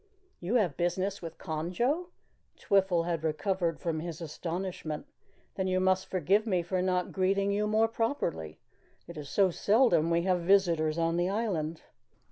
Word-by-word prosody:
"You 185 +8 -2
have 185 - +2
business 185 +3 -1
with 165 -1 -7
Conjo?" 185 - -1 0.5
Twiffle 190 -4 +2
had 170 -2 -2
recovered 170 +1 -1
from 165 -2 -2
his 165 -1 -6
astonishment. 165 -1 -5 0.5
"Then 190 -1 -2
you 185 0 +1
must 185 0 +2
forgive 190 +5 +1
me 180 -4 +1
for 180 +2 -1
not 180 -1 0
greeting 195 +1 +1
you 210 +1 0
more 220 +1 +3
properly. 225 - -2 0.5
It 170 - -9
is 150 -2 -7
so 195 -3 +3
seldom 205 -4 +3
that - - -1
we 170 - +3
have 185 -1 +2
visitors 170 -4 +3
on 165 0 +1
the 175 +1 +1
island." 175 -7 -2
180 Hz, 160 wpm, -30 LUFS, 165-200 Hz, 0.5 s, more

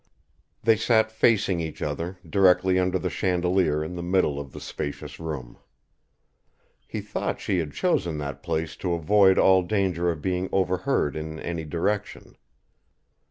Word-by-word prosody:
They 115 -1 +4
sat 110 -1 +2
facing 105 -5 +2
each 80 -2 -5
other, 85 +5 -3
directly 95 +1 +4
under 90 0 +1
the 90 0 -3
chandelier 90 -4 +1
in 80 +3 -6
the 90 - -5
middle 85 -5 +1
of 70 -2 -8
the - - -9
spacious 75 0 -6
room. 75 -7 -6 1.3
He - - -4
thought - - -3
she 95 - 0
had 80 -3 -3
chosen 80 +3 0
that 70 -2 -5
place 80 0 -2
to 90 -2 -2
avoid 95 +4 +4
all 95 -1 +5
danger 90 -3 0
of 80 -3 -2
being 90 +3 -2
overheard 95 - 0
in 80 0 -5
any 85 -2 -4
direction. 95 +6 -3
90 Hz, 150 wpm, -25 LUFS, 80-95 Hz, 1.3 s, all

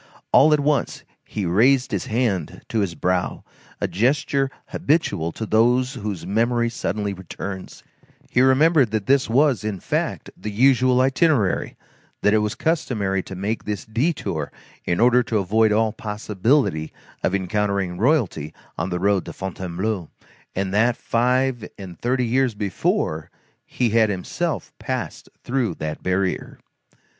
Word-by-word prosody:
All 155 +3 +6
at 150 - +4
once, 145 0 0 0.2
he 105 - -4
raised 125 +9 +3
his 100 - -2
hand 110 -8 -1
to 115 - 0
his 95 -5 -1
brow, 90 +3 -1 0.4
a - - 0
gesture 135 - +1 0.2
habitual 140 - 0
to 110 - -4
those 125 +4 +3
whose 105 - -5
memory 120 +3 +1
suddenly 105 -2 -2
returns; 95 +1 -7 0.4
he 125 - +2
remembered 135 +1 +5
that 110 -2 -2
this 135 -2 +3
was, 130 -1 +3
in 105 -3 -3
fact, - - -2
the 105 - -6
usual 125 +3 +4
itinerary, 135 - +2 0.5
that 105 - +4
it 110 - +4
was 105 0 -1
customary 105 - 0
to 95 - -9
make 100 +5 -3
this 105 -3 -4
detour 110 - -1 0.3
in 85 - 0
order 125 +1 +5
to 115 -2 -1
avoid 105 +3 +2
all 110 +1 +2
possibility 105 - 0 0.3
of 95 - +1
encountering 100 -1 -1
royalty 110 - +1 0.2
on 85 +3 -1
the 90 - -1
road 100 +1 +2
to - - -7
Fontainebleau, 95 0 -3 0.5
and 95 0 -2
that, 115 +3 +3
five 125 0 0
and 90 -4 -9
thirty 125 +1 +1
years 125 0 +1
before, 85 -6 -1 0.4
he 120 -3 0
had 110 -1 +4
himself 95 -3 -3
passed - - -4
through 120 -8 -1
that 75 0 -5
barrier. 95 0 -1
110 Hz, 145 wpm, -22 LUFS, 95-125 Hz, 0.5 s, All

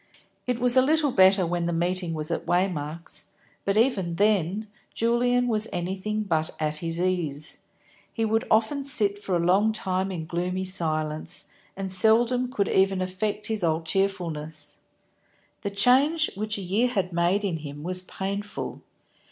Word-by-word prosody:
It 250 -1 0
was 245 0 +1
a 260 - +7
little 300 +1 +2
better 190 -2 +5
when 170 0 -1
the - - 0
meeting 175 0 -1
was 155 0 -3
at - - -3
Waymark's, 165 -4 -1 0.4
but 200 +1 +1
even 200 -8 +1
then 205 0 +1 0.3
Julian 245 +2 +2
was 220 -2 +2
anything 190 +4 -2
but 160 -5 0
at 155 -1 -1
his 165 +1 -3
ease. 170 -5 -1 0.5
He 225 - -1
would 220 +1 +1
often 230 +6 +2
sit 205 -7 +3
for 195 -3 -2
a - - +2
long 200 +5 +4
time 190 -3 -1
in 165 -4 -5
gloomy 180 +2 -2
silence, 155 -4 0 0.3
and 195 -1 -3
seldom 235 +6 +3
could 200 -6 0
even 190 0 +2
affect 195 +3 -2
his 215 -3 -2
old 165 0 0
cheerfulness. 160 -6 -2 0.8
The 200 - -2
change 265 +10 +3
which 210 +1 -3
a 200 - -5
year 205 +7 +1
had 195 -7 -2
made 175 +4 +1
in 185 -5 -1
him 145 -1 -8
was 180 +2 -1
painful. 200 +2 -5
190 Hz, 160 wpm, -26 LUFS, 170-215 Hz, 0.8 s, a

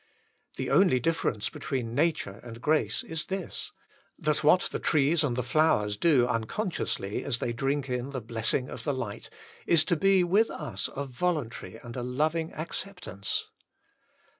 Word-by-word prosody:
The - - -2
only 180 -10 +5
difference 125 -7 0
between 120 -4 -3
nature 145 -9 0
and 115 -1 -9
grace 150 +5 +1
is 160 0 -4
this, 190 -2 -4 0.5
that 150 0 0
what 180 +5 +6
the - - -2
trees 155 +1 +3
and 130 -5 0
the 125 - -1
flowers 125 -7 +2
do 130 +1 +4
unconsciously, 115 - -2
as 120 - +1
they 120 - -2
drink 135 +3 -1
in 125 +1 -2
the 135 -2 -3
blessing 115 +3 0
of - - -7
the 145 -3 0
light, 110 -5 -5 0.4
is 165 -2 +6
to 175 - +1
be 195 +2 +4
with 200 +6 +3
us 95 - -4
a 140 - -2
voluntary 135 -4 -2
and 120 -1 -8
a 125 - -3
loving 155 +6 0
acceptance. 165 - -4
140 Hz, 160 wpm, -28 LUFS, 120-165 Hz, 0.5 s, what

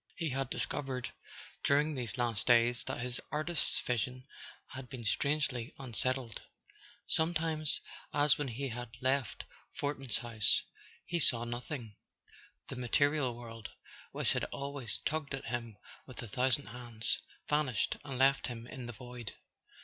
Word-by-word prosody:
He 165 -2 -1
had 135 0 -1
discovered, 130 -3 -2 0.5
during 150 +2 +4
these 125 -5 -2
last 120 -3 +1
days, 120 0 +5
that - - -3
his 125 0 -2
artist's 155 +1 +2
vision 125 +1 -1 0.4
had 130 -1 -8
been 125 -4 -6
strangely 140 -1 +1
unsettled. 130 -2 0 0.6
Sometimes, 160 -2 +2 0.3
as 145 0 +5
when 145 - -2
he 130 +3 -3
had 120 0 -5
left 130 -1 0 0.3
Fortin's 135 -4 -1
house, 115 -3 +3 0.4
he 170 - 0
saw 120 -7 +7
nothing: 120 -2 -5 0.7
the - - -5
material 130 +1 +2
world, 115 -2 -8 0.4
which - - +2
had - - 0
always 140 -5 -4
tugged 150 -3 -1
at 135 - -8
him 115 -3 -3 0.3
with 130 - -7
a - - -5
thousand 130 +4 +1
hands, 115 -2 +1 0.3
vanished 150 -7 +1
and 135 -3 -4
left 135 +1 +4
him 120 -2 -6
in 125 0 -7
the 120 - -5
void. 120 -2 -7
130 Hz, 140 wpm, -34 LUFS, 120-140 Hz, 0.7 s, saw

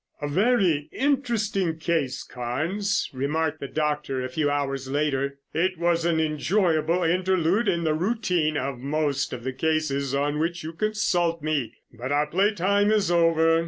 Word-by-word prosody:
"A 145 - -3
very 185 -3 +2
interesting 225 - 0
case, 160 -5 -1
Carnes," 170 +12 -2
remarked 155 +4 -1
the 140 - -5
doctor 150 -2 -1
a - - -4
few 145 +3 0
hours 135 -2 -2
later. 140 -1 -1 0.2
"It 185 +2 0
was 170 0 +1
an 170 -2 +2
enjoyable 165 +2 +1
interlude 185 +4 +1
in 170 -3 +1
the 155 -1 +1
routine 180 -4 0
of 135 -1 -3
most 140 0 -1
of 120 -2 -6
the 130 +1 -3
cases 140 -2 0
on 145 +2 0
which 170 +1 -2
you 160 +1 -6
consult 175 -4 0
me, 145 -7 -1 0.2
but 125 +4 -5
our 145 +1 +2
play 190 +7 +2
time 200 +1 +2
is 210 -4 +2
over. 165 -1 +4
160 Hz, 160 wpm, -25 LUFS, 145-180 Hz, 0.2 s, over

